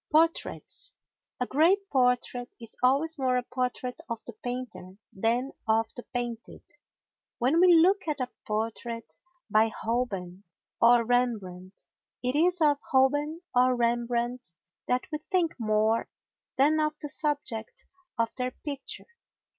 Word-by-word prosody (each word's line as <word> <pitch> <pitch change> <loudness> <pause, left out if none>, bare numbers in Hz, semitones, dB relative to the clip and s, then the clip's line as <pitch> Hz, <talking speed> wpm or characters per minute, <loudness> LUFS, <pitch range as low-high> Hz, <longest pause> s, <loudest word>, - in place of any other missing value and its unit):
Portraits 325 +2 +1 0.5
A 250 - +1
great 350 +10 +3
portrait 250 -1 +1
is 230 -2 -8
always 285 +5 +2
more 255 -1 +2
a 250 - -1
portrait 250 0 -3
of 230 -1 -3
the 240 - -8
painter 235 -5 -6 0.2
than 235 +7 0 0.2
of 220 0 +2
the 245 - -6
painted. 240 -2 -4 0.7
When 265 +7 +2
we 360 -1 +7
look 370 +3 +4
at 300 -2 -1
a 255 -1 -3 0.2
portrait 225 +1 -4 0.3
by 215 +1 +4
Holbein 210 -5 -3 0.4
or 235 0 +6
Rembrandt 205 -7 -1 0.4
it 250 +2 0
is 350 +3 +3
of 290 -2 +4
Holbein 290 +5 +2
or 250 0 +4
Rembrandt 240 -2 -1 0.3
that 250 0 +1
we 305 - -2
think 345 +1 +1
more 215 0 +1 0.5
than 300 +4 +4
of 305 0 0
the 295 - -3
subject 285 -7 -1 0.3
of 230 -1 0
their 250 -1 -1
picture. 275 +1 -6
250 Hz, 130 wpm, -28 LUFS, 230-290 Hz, 0.7 s, we